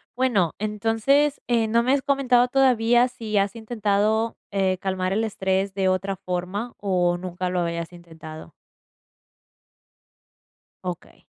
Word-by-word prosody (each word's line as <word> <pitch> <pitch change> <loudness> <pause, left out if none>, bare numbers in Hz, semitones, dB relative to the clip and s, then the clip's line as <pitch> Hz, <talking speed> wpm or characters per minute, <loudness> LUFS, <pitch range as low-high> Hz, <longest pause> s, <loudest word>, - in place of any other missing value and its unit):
Bueno, 235 -10 +1
entonces, 225 +7 +1
eh, 230 -2 +2
no 230 +2 +2
me 255 - +1
has 280 - +2
comentado 260 -3 +3
todavía, 245 -2 +3
¿si 220 -4 -4
has 200 +1 +1
intentado, 220 0 0
eh, 190 -2 +1
calmar 185 0 -2
el 215 +3 +1
estrés 190 -2 -1
de 190 -1 +1
otra 190 +1 -1
forma 185 +6 -4
o 180 -3 +1
nunca 180 0 -4
lo 180 0 -1
habías 170 0 -3
intentado? 160 -2 -11 2.3
Okey. 180 -2 -7
200 Hz, 125 wpm, -24 LUFS, 185-235 Hz, 2.3 s, comentado